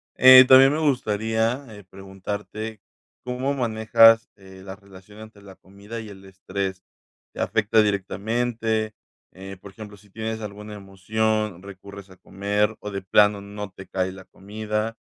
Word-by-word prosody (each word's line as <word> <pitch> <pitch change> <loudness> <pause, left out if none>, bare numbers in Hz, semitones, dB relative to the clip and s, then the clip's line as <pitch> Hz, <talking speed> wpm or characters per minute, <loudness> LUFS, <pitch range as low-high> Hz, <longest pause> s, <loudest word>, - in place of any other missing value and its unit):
Eh, 130 0 +9
también 135 +2 +7
me 155 - -2
gustaría, 115 -2 -1
eh, 105 - -13
preguntarte, 100 +3 -7 0.4
¿cómo 125 +3 -2
manejas, 115 -2 +4
eh, 95 -1 -15
la 95 -1 -8
relación 100 +1 -17
entre 110 -1 -14
la 100 -1 -14
comida 100 +5 -11
y 110 - -10
el 95 -1 -13
estrés? 95 0 -5 0.5
¿Te - - -11
afecta 110 0 +2
directamente?, 110 +2 -2 0.4
eh, 95 +1 -10
por 100 - -13
ejemplo, 105 0 -12
si 100 0 -23
tienes 110 +1 -5
alguna 105 0 -8
emoción, 105 0 -2
recurres 100 0 -12
a 95 - -16
comer, 105 +4 -2
o 105 - -6
de 100 0 -5
plano 105 +2 +3
no 100 0 -8
te 95 0 -13
cae 95 0 -2
la 95 0 -13
comida, 105 +2 -5
105 Hz, 150 wpm, -23 LUFS, 95-110 Hz, 0.5 s, Eh